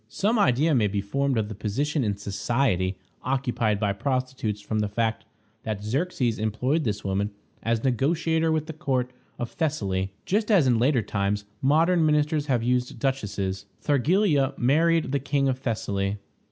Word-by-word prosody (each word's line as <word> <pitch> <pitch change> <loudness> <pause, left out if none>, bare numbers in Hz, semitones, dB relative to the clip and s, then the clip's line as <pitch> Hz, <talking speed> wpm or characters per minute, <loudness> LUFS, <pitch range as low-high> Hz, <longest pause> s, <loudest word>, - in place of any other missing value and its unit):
Some 215 - +1
idea 155 -3 +3
may 115 -6 +3
be 100 0 -1
formed 135 +6 0
of 110 -2 0
the 110 - -6
position 135 +9 -1
in 100 -3 -1
society 100 -2 0 0.2
occupied 125 -5 0
by 100 -2 +1
prostitutes 130 -2 -2
from 110 +1 -2
the 105 -1 0
fact 110 +1 -1 0.4
that 105 -2 -4
Xerxes 125 -1 -1
employed 125 +9 0
this 105 -2 -2
woman 100 +1 0 0.3
as 115 0 0
negotiator 160 +5 +1
with 155 -1 0
the 160 - -6
court 130 -6 -1 0.3
of 120 - -4
Thessaly, 100 - -1
just 210 +3 0
as 195 -9 +5
in 120 -3 +3
later 125 -1 +3
times 100 0 -1 0.2
modern 165 +5 +3
ministers 150 -1 +2
have 125 -5 +1
used 125 0 0
duchesses. 100 -7 -2
Thargelia 145 - +2
married 160 +5 +2
the 140 - +1
King 140 0 0
of 130 -1 0
Thessaly. 100 -5 -2
125 Hz, 160 wpm, -26 LUFS, 105-150 Hz, 0.4 s, as